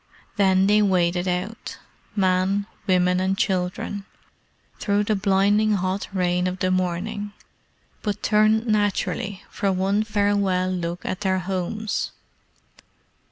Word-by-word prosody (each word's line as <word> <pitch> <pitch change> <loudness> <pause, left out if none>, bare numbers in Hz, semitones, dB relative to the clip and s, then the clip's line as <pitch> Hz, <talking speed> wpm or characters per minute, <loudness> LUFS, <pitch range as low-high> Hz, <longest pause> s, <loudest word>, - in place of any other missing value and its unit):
Then 190 -2 +4
they 210 +1 +4
waded 180 -2 +2
out 185 +5 -3 0.4
men, 190 +1 +2 0.2
women, 180 -1 +3
and 190 +1 0
children 190 +1 -1 0.7
through 205 0 +1
the 215 +1 +1
blinding 205 +2 +3
hot 185 0 -1
rain 180 -1 +1
of 185 0 -3
the 185 0 0
morning, 190 +3 -2 0.7
but 205 -3 -3
turned 215 +1 +3
naturally 205 -2 -1
for 195 - 0
one 190 +2 +1
farewell 200 -3 +1
look 175 -1 -4
at 185 - -3
their 190 -2 +1
homes. 190 +4 -3
195 Hz, 115 wpm, -23 LUFS, 185-205 Hz, 0.7 s, Then